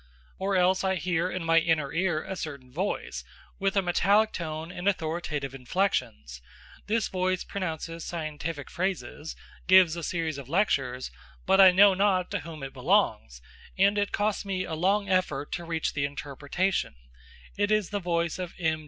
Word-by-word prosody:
Or 195 +1 0
else 185 +1 +3
I 190 0 +1
hear 175 0 0
in 185 -2 -4
my 165 0 +5
inner 160 -4 0
ear 170 -2 0
a 190 - -5
certain 140 -7 -7
voice, 190 +7 -3 0.4
with 195 0 0
a 195 - +3
metallic 200 +5 +3
tone 160 0 -5
and 180 +2 -5
authoritative 160 -6 -1
inflections: 125 - -2 0.5
this 220 0 +1
voice 185 -1 -1
pronounces 165 -3 -5
scientific 155 -2 -5
phrases, 180 -4 -3 0.3
gives 185 -3 +6
a 170 - -5
series 160 -3 -2
of 135 -2 -10
lectures, 135 -9 0 0.3
but 190 +1 +5
I 190 - +10
know 195 +2 +6
not 190 -2 +1
to 200 - -1
whom 155 -2 -9
it 135 - -6
belongs, - - +1 0.3
and 200 +2 +4
it 205 -1 0
costs 205 0 0
me 190 -2 -2
a 160 - -5
long 195 +5 +1
effort 180 -7 0
to 175 - -4
reach 165 -1 -2
the 140 -1 0
interpretation: 145 - -2 0.6
it 205 0 +1
is 215 -3 +1
the 205 - -1
voice 170 -2 -1
of 180 -2 -5
M. 160 -3 0
175 Hz, 170 wpm, -27 LUFS, 155-190 Hz, 0.6 s, I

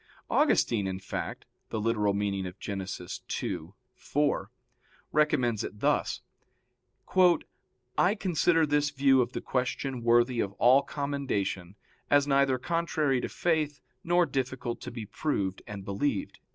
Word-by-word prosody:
Augustine, 105 -4 +3
in 95 -1 -3
fact 95 - -5 0.2
(Gen. - - -3
ad 105 - -3
lit. 100 -2 -3
ii, - - -2 0.3
4), 145 -7 -1 0.6
recommends 130 -8 +2
it 105 - -7
thus: - - +1 1.8
"I 190 +4 +4
consider 170 -4 +2
this 150 0 +2
view 135 -2 +4
of 120 +1 -2
the - - -3
question 130 0 -2
worthy 120 +1 +3
of 100 -2 -1
all 125 +6 +5
commendation, 130 - -3 0.3
as 145 -1 +5
neither 140 -2 +3
contrary 155 -3 0
to - - -3
faith 155 -4 0 0.2
nor 175 +1 +3
difficult 130 -3 -3
to - - -6
be 115 -2 -6
proved 100 -5 -2
and 100 -2 -7
believed." 100 +2 -2
130 Hz, 125 wpm, -29 LUFS, 105-145 Hz, 1.8 s, all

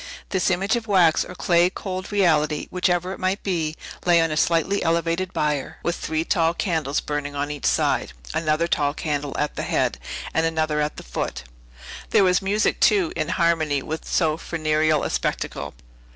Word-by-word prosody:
This 190 -2 +1
image 190 +4 +1
of 230 -1 -4
wax 180 -6 +4
or 180 - -10
clay 175 0 +3
cold 185 0 -6
reality, 155 -7 +2
whichever 180 0 0
it - - -9
might 185 +2 -1
be, 165 -5 -1 0.3
lay 175 -1 +5
on 165 -1 +2
a - - -1
slightly 170 +5 +2
elevated 170 +2 0
bier, 150 -5 -1
with 170 - 0
three 160 +1 -2
tall 165 0 +2
candles 160 -7 0
burning 145 -1 -4
on 145 +1 -2
each 145 -2 -2
side, - - +1 0.2
another 155 +1 +1
tall 145 -3 0
candle 145 -3 -3
at 150 - -1
the - - -3
head, - - 0 0.3
and 160 - +2
another 155 -2 0
at 150 0 -2
the - - -8
foot. - - -4 0.7
There - - +4
was 180 0 +3
music, 205 +3 +1
too; 360 -5 +3
in 155 - -2
harmony 160 -6 +1
with 160 +1 -5
so 160 -3 +1
funereal 155 -2 +1
a - - -2
spectacle. - - -3
165 Hz, 180 wpm, -23 LUFS, 155-185 Hz, 0.7 s, lay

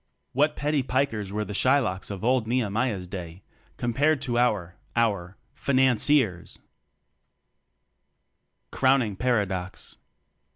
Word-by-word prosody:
What 150 +3 +2
petty 150 -1 0
"Pikers" 125 -6 -1
were 105 +1 -2
the 105 - -6
Shy 130 +7 +4
locks 95 -9 -2
of 100 0 -6
old 125 -1 +2
Nehemiah's 110 -4 -1
day 90 -1 -8 0.3
compared 140 +6 +1
to 120 -1 0
our... 105 -8 +1 0.2
our... 100 -6 0 0.2
"Financiers"^. 130 - +2 2.1
Crowning 130 -6 +2
Paradox. 100 -5 -2
115 Hz, 100 wpm, -26 LUFS, 100-130 Hz, 2.1 s, Shy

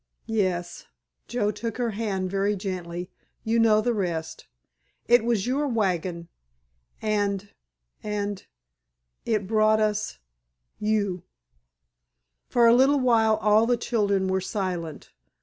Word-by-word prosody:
"Yes," 185 -6 -2 0.4
Joe 210 -4 0
took 230 0 -5
her 240 -2 -1
hand 195 -4 -2
very 200 +1 +1
gently, 180 -2 -5 0.3
"you 230 +1 +1
know 215 -2 +5
the 240 +2 0
rest. 170 -6 -3 0.6
It 240 -1 +5
was 230 -4 0
your 275 +4 0
wagon—and—and—it 180 - -3 2.0
brought 215 0 +3
us—you." 180 - -3 1.3
For 240 -1 +4
a 230 - +7
little 270 +3 +4
while 225 -4 +3
all 215 +2 +3
the 245 0 +2
children 200 -5 0
were 190 0 0
silent. 180 -5 -4
205 Hz, 100 wpm, -25 LUFS, 180-225 Hz, 2.0 s, a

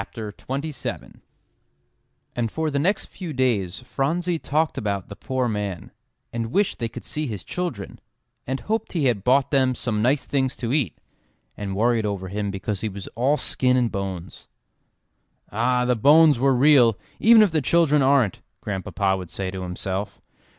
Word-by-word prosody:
EXCLAIMED 115 +6 -5
JASPER 155 -3 -5 1.2
And 120 -2 -1
for 160 +5 -2
the 140 - 0
next 190 +7 +1
few 175 -5 -7
days 115 -7 0
Phronsie 160 +7 -1
talked 155 +2 0
about 100 -3 -3
the 100 - -8
poor 130 +2 -2
man, 105 -5 -4 0.4
and 115 -1 -3
wished 200 +5 +1
they 115 - -1
could - - -9
see 155 0 -3
his 105 -6 -5
children, 180 -1 -5 0.5
and 135 +1 -2
hoped 220 +1 -2
he 160 -6 0
had 115 -7 +1
bought 130 +3 +3
them 130 -3 +3
some 110 -4 -2
nice 130 +5 +2
things 135 -2 0
to 120 0 -3
eat, 130 - 0 0.6
and 100 -2 -4
worried 115 +1 +2
over 95 -2 -4
him 100 +1 -2
because 100 0 -4
he 110 - -1
was 100 -1 -8
all 135 +6 +1
skin 125 -3 +1
and 120 -2 +1
bones. 95 -4 -6 1.0
"Ah! 125 +3 +1
the 125 0 +2
bones 150 +4 +6
were 135 0 +3
real, 125 -5 +5 0.2
even 225 0 +7
if 200 - +2
the 155 -1 +1
children 150 +1 +3
aren't," 130 -7 +3 0.2
Grandpapa 95 0 -1
would 90 -3 -8
say 95 -1 -4
to 95 0 -6
himself. 95 +2 -4
125 Hz, 170 wpm, -23 LUFS, 105-145 Hz, 1.2 s, even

